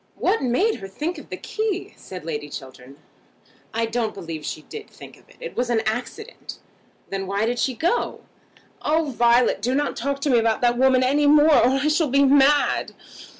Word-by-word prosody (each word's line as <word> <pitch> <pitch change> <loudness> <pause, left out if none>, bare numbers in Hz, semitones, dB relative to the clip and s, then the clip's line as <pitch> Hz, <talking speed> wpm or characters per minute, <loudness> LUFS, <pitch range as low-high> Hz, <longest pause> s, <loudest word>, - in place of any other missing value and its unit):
"What 450 - 0
made 315 - +1
her 195 - -8
think 305 - -4
of - - -14
the - - -5
key?" 430 -4 -3
said 180 -4 -10
Lady 150 -2 -4
Chiltern. 130 0 -10 0.7
"I 230 +1 -1
don't 225 -1 -2
believe 165 -5 -7
she 155 - -5
did 430 - -10
think - - -13
of - - -24
it. - - -19
It - - -8
was 245 0 -1
an 230 -2 +2
accident." 245 - -5 0.5
"Then 195 -1 -3
why 200 +3 0
did 240 +1 -1
she 260 0 0
go?" 345 - -1 0.6
"Oh, 310 -1 0
Violet, 235 -2 +3
do 250 +4 0
not 290 +1 -1
talk 275 +3 -2
to 285 - +1
me 240 - +5
about 225 -1 0
that 240 0 +2
woman 260 -1 +4
any 285 +3 +2
more, 300 +1 +6
or 245 -3 +5
I 275 +2 0
shall 305 0 +2
be 280 +2 +4
mad." 280 +1 +3
250 Hz, 195 wpm, -23 LUFS, 220-295 Hz, 0.7 s, more